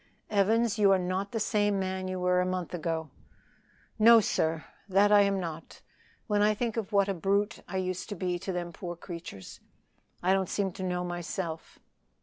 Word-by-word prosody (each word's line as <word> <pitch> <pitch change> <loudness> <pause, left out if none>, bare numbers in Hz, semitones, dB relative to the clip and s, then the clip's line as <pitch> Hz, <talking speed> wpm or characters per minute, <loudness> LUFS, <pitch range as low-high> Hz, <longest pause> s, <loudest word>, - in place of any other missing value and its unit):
Evans, 220 +2 +2
you 200 -2 +5
are 195 - +5
not 185 +2 -2
the 225 - -2
same 205 -1 +1
man 190 0 -2
you 185 0 -3
were 180 0 +2
a - - +2
month 185 -2 -3
ago." 160 -3 -3 0.9
"No, 230 +1 +8
sir, 160 -6 0 0.2
that 200 +2 +4
I 205 -1 +7
am 200 -1 +2
not. 165 -3 -7 0.4
When 210 -2 +1
I 210 +1 +4
think 230 0 -2
of 225 -2 -3
what 200 -1 +3
a 195 - 0
brute 200 +4 0
I 190 - -4
used 185 +1 -3
to 205 - -4
be 180 -1 -2
to 190 - -4
them 175 -1 -4
poor 175 0 -6
creatures, 170 - -9 0.6
I 185 +2 +4
don't 190 -2 0
seem 195 -2 -1
to 190 - -7
know 180 -1 -1
myself." 175 -1 -5
190 Hz, 190 wpm, -29 LUFS, 175-205 Hz, 0.9 s, No